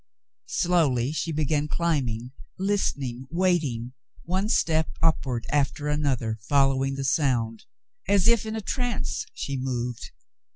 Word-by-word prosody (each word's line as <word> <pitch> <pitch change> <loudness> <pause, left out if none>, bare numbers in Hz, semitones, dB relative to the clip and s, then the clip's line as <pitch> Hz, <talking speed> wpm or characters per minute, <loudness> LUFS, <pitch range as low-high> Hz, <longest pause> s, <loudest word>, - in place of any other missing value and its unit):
Slowly 150 -8 +2
she 160 +1 -2
began 150 -1 0
climbing, 130 -9 -1 0.3
listening, 140 -11 -1
waiting, 155 -9 0 0.3
one 190 +4 -1
step 160 -6 +2
upward 135 -7 +1
after 145 0 +1
another, 130 -7 0
following 135 -1 +3
the 135 - -3
sound. 125 -5 +1 0.4
As 200 -1 +4
if 235 -2 +5
in 220 - -3
a 220 - -2
trance 245 +1 -2
she 140 -1 -3
moved. 125 -2 -3
145 Hz, 120 wpm, -26 LUFS, 125-170 Hz, 0.4 s, if